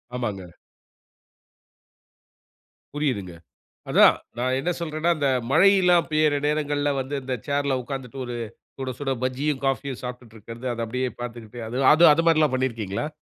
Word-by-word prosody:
ஆமாங்க. 105 -7 -3 2.5
புரியுதுங்க. 125 - -2 0.6
அதான், - - +6 0.2
நான் 130 +2 0
என்ன 175 +6 -1
சொல்றேன்னா, 160 0 -1
இந்த 145 -2 +1 0.2
மழை 195 +8 +6
எல்லாம் 175 -2 +4
பெய்யிற 155 -1 +3
நேரங்கள்ல 145 -1 0
வந்து, 135 +2 -5
இந்த 130 0 -2
சேர்ல 140 -2 0
உக்காந்துட்டு 135 0 -7
ஒரு 120 -1 -5 0.4
சுடசுட 135 +1 -4
பஜ்ஜியும், 130 +2 -1
காஃபியும் 135 -1 -2
சாப்பிட்டுட்டு 125 -2 -8
இருக்கிறது, 115 +3 -10
அது 115 -1 -3
அப்படியே 125 +3 -2
பாத்துக்கிட்டு, 120 -1 -7
அது 120 - -4 0.2
அது 165 +3 +6
அதுமாரிலாம் 160 -3 +3
பண்ணியிருக்கீங்களா? 115 -3 -2
130 Hz, 125 wpm, -24 LUFS, 120-150 Hz, 2.5 s, அதான்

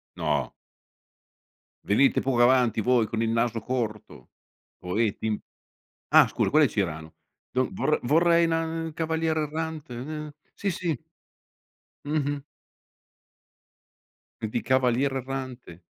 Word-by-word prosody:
No. - - -1 1.3
Venite 130 +7 +3
poco 130 -3 +1
avanti 125 -2 +4
voi 120 0 +3
con 115 +1 -2
il 115 - +1
naso 115 0 +1
corto, 110 -3 -4 0.5
poeti 105 +4 -1
im. 110 -1 0 0.7
Ah - - +7
scusa - - -1
quello 155 +1 +5
è - - +3
Cirano. 80 -7 -3 0.4
Do 130 0 +1
vor 170 -5 0
vorrei 170 +5 +4
na 165 0 -1
cavaliere 160 0 0
errante 155 -3 -4
n 150 +5 -6 0.2
Sì, 200 - -2
sì. 165 -7 -2 1.1
Mh-mh. 145 -1 -1 2.0
E 110 - -1
di - - -2
cavaliere 130 +1 +2
errante, 130 -9 -7
130 Hz, 115 wpm, -26 LUFS, 115-155 Hz, 2.0 s, Ah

